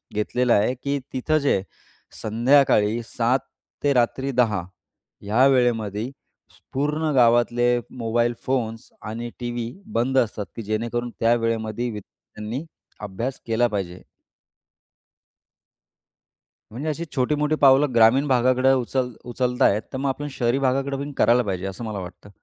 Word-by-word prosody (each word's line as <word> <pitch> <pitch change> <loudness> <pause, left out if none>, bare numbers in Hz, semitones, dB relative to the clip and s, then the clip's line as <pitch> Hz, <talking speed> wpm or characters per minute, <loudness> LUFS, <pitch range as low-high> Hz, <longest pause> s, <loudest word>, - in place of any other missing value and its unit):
घेतलेला 120 +3 +1
आहे, 105 +5 +3
की 140 0 -1
तिथं 155 +4 +1
जे 95 - +3 0.6
संध्याकाळी 115 -1 +3
7:00 120 +3 0 0.4
ते 145 - +3
रात्री 130 +2 +1
10:00 105 -6 0 0.6
या 120 +6 +4
वेळेमध्ये 115 -4 +1 0.6
पूर्ण 150 +3 0
गावातले 120 0 +3 0.2
मोबाईल 120 +1 0
फोन्स 115 -4 -2
आणि 115 +2 -5
टी. 120 -1 -3
व्ही. 120 0 -4 0.2
बंद 125 +3 +1
असतात, 105 -5 0
की 115 - -5
जेणेकरून 115 +3 -2
त्या 115 +1 +4
वेळेमध्ये 115 0 -2
विद्यार्थ्यांनी 105 - -8 0.4
अभ्यास 105 +6 -4
केला 115 +2 +2
पाहिजे. 95 -5 -5 2.7
म्हणजे 140 +8 -4
अशी 160 +3 -3
छोटी-मोठी 150 +3 +1
पावलं 135 -1 +4
ग्रामीण 120 +6 +5
भागाकडे 130 0 +3
उचल 125 0 -1
उचलतायेत, 125 -3 +1
तर 130 - -2
मग 135 +1 -1
आपण 145 +2 -3
शहरी 125 0 0
भागाकडे 135 +1 0
पण 140 +1 -5
करायला 120 +1 +4
पाहिजे, 95 -3 -3
असं 95 +4 -6
मला 105 -3 -4
वाटतं. 90 +2 -10
120 Hz, 130 wpm, -23 LUFS, 110-135 Hz, 2.7 s, ग्रामीण